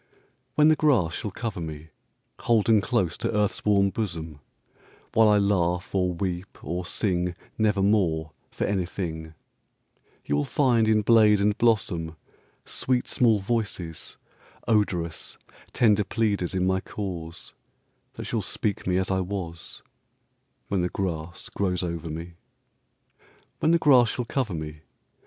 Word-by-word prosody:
When 150 Hz, +1 st, +6 dB
the 155 Hz, -, +5 dB
grass 125 Hz, -, +2 dB
shall 105 Hz, -, -3 dB
cover 105 Hz, -2 st, -5 dB
me, 80 Hz, 0 st, -7 dB, 0.5 s
Holden 110 Hz, -2 st, +3 dB
close 100 Hz, -6 st, 0 dB
to -, -, -1 dB
earth's 105 Hz, -2 st, 0 dB
warm 100 Hz, -2 st, +3 dB
bosom,—While 85 Hz, -, -3 dB
I 105 Hz, -, +5 dB
laugh, 90 Hz, -3 st, +1 dB
or 90 Hz, -2 st, +1 dB
weep, 90 Hz, +1 st, -4 dB
or 90 Hz, +1 st, -3 dB
singNevermore, 90 Hz, -2 st, 0 dB, 0.2 s
for -, -, -4 dB
anything, 85 Hz, -4 st, -3 dB, 0.9 s
You 70 Hz, -, 0 dB
will 75 Hz, -, +1 dB
find 120 Hz, -, +2 dB
in 110 Hz, -1 st, +3 dB
blade 105 Hz, -2 st, +5 dB
and 105 Hz, +1 st, +2 dB
blossom, 90 Hz, -9 st, +1 dB, 0.5 s
Sweet 125 Hz, -1 st, -1 dB
small 115 Hz, -4 st, +3 dB
voices, 95 Hz, -7 st, -3 dB, 0.5 s
odorous, 90 Hz, -7 st, 0 dB, 0.3 s
Tender 105 Hz, -3 st, +3 dB
pleaders 100 Hz, -4 st, -1 dB
in 90 Hz, -1 st, +1 dB
my 95 Hz, 0 st, +2 dB
cause, 85 Hz, -5 st, -6 dB, 0.6 s
That -, -, -7 dB
shall -, -, -1 dB
speak 100 Hz, -3 st, -2 dB
me 90 Hz, 0 st, +2 dB
as 95 Hz, 0 st, 0 dB
I 95 Hz, -, +1 dB
was—When 115 Hz, +6 st, -7 dB
the 90 Hz, -, 0 dB
grass 85 Hz, -3 st, -4 dB
grows 90 Hz, -2 st, -1 dB
over 85 Hz, -1 st, -4 dB
me. 85 Hz, +3 st, -6 dB, 1.3 s
When 155 Hz, -, +2 dB
the 170 Hz, -, +5 dB
grass 130 Hz, -7 st, +5 dB
shall 125 Hz, -, -3 dB
cover 120 Hz, -6 st, -2 dB
me! 75 Hz, -1 st, -6 dB
95 Hz, 130 wpm, -26 LUFS, 85-110 Hz, 1.3 s, When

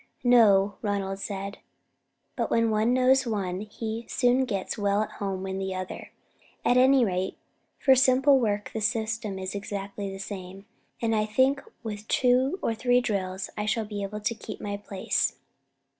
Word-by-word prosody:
"No," 205 Hz, -5 st, +5 dB
Ronald 195 Hz, -2 st, -2 dB
said, 200 Hz, 0 st, -5 dB, 0.8 s
"but -, -, -1 dB
when 230 Hz, -1 st, +2 dB
one 215 Hz, +2 st, +2 dB
knows 255 Hz, +1 st, +4 dB
one, 190 Hz, -5 st, -2 dB
he 220 Hz, +2 st, -5 dB
soon 250 Hz, +1 st, +3 dB
gets 200 Hz, -6 st, -3 dB
well 205 Hz, 0 st, +1 dB
at -, -, -7 dB
home 190 Hz, -1 st, -2 dB
in 190 Hz, 0 st, -3 dB
the 190 Hz, -1 st, -3 dB
other. 185 Hz, 0 st, -6 dB, 0.6 s
At 245 Hz, -, +4 dB
any 260 Hz, 0 st, +5 dB
rate, 185 Hz, -1 st, -2 dB, 0.4 s
for 265 Hz, -, +5 dB
simple 265 Hz, +1 st, +5 dB
work 210 Hz, -3 st, -1 dB
the 220 Hz, -, -3 dB
system 220 Hz, -1 st, -1 dB
is 190 Hz, 0 st, -4 dB
exactly 200 Hz, 0 st, -5 dB
the 195 Hz, -, -7 dB
same, 195 Hz, 0 st, -8 dB, 0.4 s
and 225 Hz, -1 st, +2 dB
I 215 Hz, 0 st, +1 dB
think 260 Hz, +5 st, +2 dB, 0.2 s
with 215 Hz, -1 st, -6 dB
two 255 Hz, +6 st, +2 dB
or 230 Hz, -, +1 dB
three 245 Hz, +2 st, +3 dB
drills 190 Hz, -5 st, -3 dB
I 210 Hz, 0 st, -3 dB
shall 220 Hz, 0 st, 0 dB
be 205 Hz, -1 st, -5 dB
able 205 Hz, +2 st, -5 dB
to 215 Hz, -, 0 dB
keep 225 Hz, -, -8 dB
my 205 Hz, -1 st, -4 dB
place." 200 Hz, -1 st, -1 dB
210 Hz, 170 wpm, -27 LUFS, 195-245 Hz, 0.8 s, No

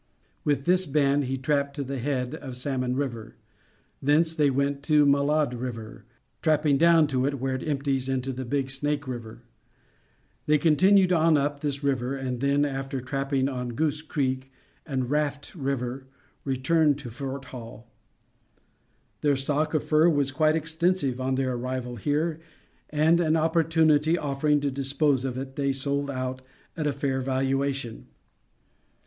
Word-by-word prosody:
With 140 Hz, -2 st, 0 dB
this 180 Hz, 0 st, +3 dB
band 140 Hz, -1 st, +2 dB
he 135 Hz, +1 st, -2 dB
trapped 140 Hz, +1 st, 0 dB
to 145 Hz, -, -3 dB
the 135 Hz, 0 st, -4 dB
head 125 Hz, -1 st, -2 dB
of 130 Hz, -3 st, -7 dB
Salmon 130 Hz, -1 st, -2 dB
River. 120 Hz, -6 st, -4 dB, 0.7 s
Thence 155 Hz, +4 st, +3 dB
they 150 Hz, -3 st, +3 dB
went 140 Hz, +1 st, 0 dB
to 150 Hz, -2 st, +4 dB
Malade 140 Hz, 0 st, +2 dB
River, 115 Hz, -3 st, -6 dB, 0.4 s
trapping 150 Hz, -3 st, +2 dB
down 165 Hz, 0 st, +6 dB
it 150 Hz, -, 0 dB
to 130 Hz, -, +1 dB
where 135 Hz, 0 st, -1 dB
it 130 Hz, -, -3 dB
empties 135 Hz, -2 st, -1 dB
into 130 Hz, 0 st, -1 dB
the 130 Hz, +1 st, -5 dB
Big 135 Hz, +1 st, -1 dB
Snake 145 Hz, +1 st, -2 dB
River. 115 Hz, -2 st, -7 dB, 1.0 s
They 150 Hz, 0 st, +5 dB
continued 185 Hz, +5 st, +4 dB
on 165 Hz, -2 st, +4 dB
up 145 Hz, 0 st, -1 dB
this 145 Hz, -1 st, -3 dB
latter -, -, +1 dB
river, 130 Hz, 0 st, -1 dB
and 130 Hz, -2 st, -3 dB
then, 140 Hz, +2 st, +2 dB
after 135 Hz, -1 st, -3 dB
trapping 135 Hz, +1 st, -1 dB
on 125 Hz, -3 st, -4 dB
Goose 155 Hz, +1 st, +1 dB
Creek 135 Hz, -4 st, -2 dB, 0.4 s
and 130 Hz, -4 st, -1 dB
Raft 145 Hz, -1 st, -1 dB
River, 135 Hz, -3 st, -3 dB, 0.4 s
returned 145 Hz, +2 st, +2 dB
to 130 Hz, -5 st, -8 dB
Fort 135 Hz, +2 st, -6 dB
Hall. 115 Hz, -2 st, -9 dB, 1.3 s
Their 145 Hz, -1 st, +3 dB
stock 150 Hz, +4 st, -1 dB
of 155 Hz, -, +1 dB
fur 155 Hz, +2 st, +4 dB
was 145 Hz, -4 st, +1 dB
quite 155 Hz, +2 st, +2 dB
extensive 160 Hz, -4 st, 0 dB
on 130 Hz, 0 st, 0 dB
their 130 Hz, -1 st, 0 dB
arrival 125 Hz, 0 st, -4 dB
here 150 Hz, -, -1 dB, 0.5 s
and, 155 Hz, +3 st, +3 dB
an 160 Hz, -1 st, +2 dB
opportunity 160 Hz, -1 st, +3 dB
offering 145 Hz, 0 st, +1 dB
to 140 Hz, -1 st, 0 dB
dispose 135 Hz, 0 st, +1 dB
of 130 Hz, -2 st, -3 dB
it, 135 Hz, 0 st, -6 dB
they 140 Hz, -1 st, +1 dB
sold 140 Hz, +1 st, -1 dB
out 130 Hz, -1 st, -3 dB, 0.3 s
at 155 Hz, -2 st, -1 dB
a -, -, +2 dB
fair 135 Hz, -1 st, -1 dB
valuation. 135 Hz, -1 st, -1 dB
140 Hz, 155 wpm, -26 LUFS, 130-150 Hz, 1.3 s, down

